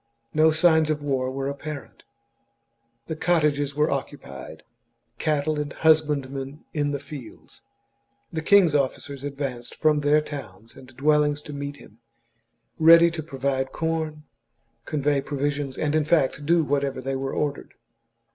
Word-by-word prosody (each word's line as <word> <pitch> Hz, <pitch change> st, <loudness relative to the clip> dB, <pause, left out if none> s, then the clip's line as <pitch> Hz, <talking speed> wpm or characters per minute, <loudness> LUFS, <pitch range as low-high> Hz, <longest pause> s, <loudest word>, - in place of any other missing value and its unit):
No 155 Hz, +1 st, +5 dB
signs 160 Hz, 0 st, +4 dB
of 150 Hz, -1 st, -1 dB
war 130 Hz, -3 st, 0 dB
were 135 Hz, +1 st, -3 dB
apparent; 140 Hz, 0 st, -7 dB, 1.0 s
the 160 Hz, -, -4 dB
cottages 150 Hz, -4 st, +1 dB
were 150 Hz, +1 st, +2 dB
occu 140 Hz, +1 st, -3 dB
pied, 70 Hz, -1 st, -10 dB, 0.6 s
cattle 150 Hz, 0 st, 0 dB
and 145 Hz, -1 st, -3 dB
husbandmen 145 Hz, -3 st, +1 dB
in 145 Hz, -2 st, 0 dB
the 145 Hz, -, -1 dB
fields. 140 Hz, -4 st, -11 dB, 0.7 s
The 160 Hz, -, -2 dB
king's 180 Hz, -1 st, +5 dB
officers 140 Hz, 0 st, -1 dB
advanced 135 Hz, -4 st, -5 dB
from 155 Hz, -1 st, +2 dB
their 145 Hz, +1 st, +4 dB
towns 115 Hz, -9 st, -8 dB
and 130 Hz, -, -13 dB
dwell 150 Hz, +2 st, +4 dB
ings 145 Hz, 0 st, 0 dB
to 150 Hz, -, -8 dB
meet 140 Hz, 0 st, -5 dB
him, 110 Hz, -5 st, -17 dB, 0.8 s
ready 165 Hz, +1 st, +8 dB
to 165 Hz, -1 st, -4 dB
provide 135 Hz, -3 st, -2 dB
corn, 160 Hz, -2 st, -2 dB, 0.6 s
convey 145 Hz, -1 st, 0 dB
pro 145 Hz, +1 st, -5 dB
visions, 140 Hz, -1 st, -2 dB
and 150 Hz, -1 st, 0 dB
in 155 Hz, -1 st, +3 dB
fact 155 Hz, -4 st, +3 dB
to -, -, -10 dB
do 165 Hz, +3 st, +3 dB
whatever 140 Hz, -2 st, -1 dB
they 135 Hz, +1 st, -3 dB
were 135 Hz, 0 st, -3 dB
ordered. 145 Hz, -1 st, -3 dB
145 Hz, 150 wpm, -25 LUFS, 135-155 Hz, 1.0 s, ready